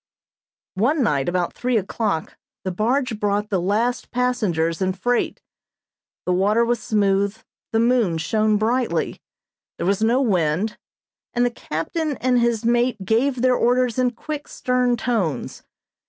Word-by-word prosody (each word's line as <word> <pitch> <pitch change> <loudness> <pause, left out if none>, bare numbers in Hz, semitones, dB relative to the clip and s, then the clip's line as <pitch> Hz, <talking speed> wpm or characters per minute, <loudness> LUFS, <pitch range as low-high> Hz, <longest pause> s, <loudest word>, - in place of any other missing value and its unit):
One 280 +5 +3
night 145 - +1
about 175 -1 -1
three 250 -1 0
o'clock 200 -4 -2 0.3
the 185 - -2
barge 235 +4 0
brought 205 0 0
the 190 -3 +1
last 220 +7 0
passengers 205 -10 0
and 185 0 0
freight. 245 +4 0 0.8
The 180 - +1
water 210 +6 +3
was 240 -1 0
smooth, 200 -1 +1 0.3
the 225 - +2
moon 230 -7 +2
shone 215 +5 +1
brightly, 240 +4 0 0.6
there - - -3
was 195 +2 +1
no 235 +4 +3
wind, 195 - +1 0.6
and 245 +1 +3
the 245 - +1
captain 280 - -3
and 250 -1 +2
his 235 -1 +1
mate 240 -3 +1
gave 245 +4 +1
their 255 -1 +5
orders 250 0 +2
in 250 -1 +3
quick, 290 +5 -6
stern 250 -1 0
tones. 200 - -2
225 Hz, 140 wpm, -22 LUFS, 195-245 Hz, 0.8 s, their